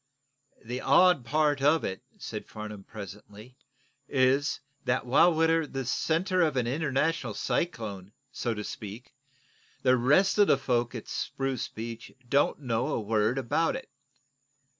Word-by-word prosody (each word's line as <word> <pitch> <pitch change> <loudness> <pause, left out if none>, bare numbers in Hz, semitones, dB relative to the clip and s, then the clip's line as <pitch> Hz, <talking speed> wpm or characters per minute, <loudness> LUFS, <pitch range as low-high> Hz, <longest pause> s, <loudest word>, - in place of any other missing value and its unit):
"The 125 +3 -4
odd 180 -9 +5
part 150 +1 +1
of 150 +3 +4
it," 95 - -4 0.2
said - - -7
Farnum, 105 -2 -8
presently, 105 +3 -11 0.5
"is, 135 +2 +2 0.3
that 125 0 0
while 160 +8 +5
we're 165 -1 +2
the 135 -2 -4
center 175 - +1
of 155 -5 +2
an 125 - +1
international 150 +4 0
cyclone, 105 - -3 0.2
so 120 -2 -2
to 105 - -4
speak, 105 +4 -8 0.7
the 130 -1 +5
rest 150 - +3
of 205 - +6
the - - +5
folks 120 -2 0
at 115 - -7
Spruce 135 -2 -3
Beach 115 +1 -7 0.2
don't 140 +3 +2
know 120 -1 -1
a 155 - -1
word 110 +3 +1
about 135 +6 +1
it. 265 - -7
130 Hz, 140 wpm, -28 LUFS, 115-155 Hz, 0.7 s, of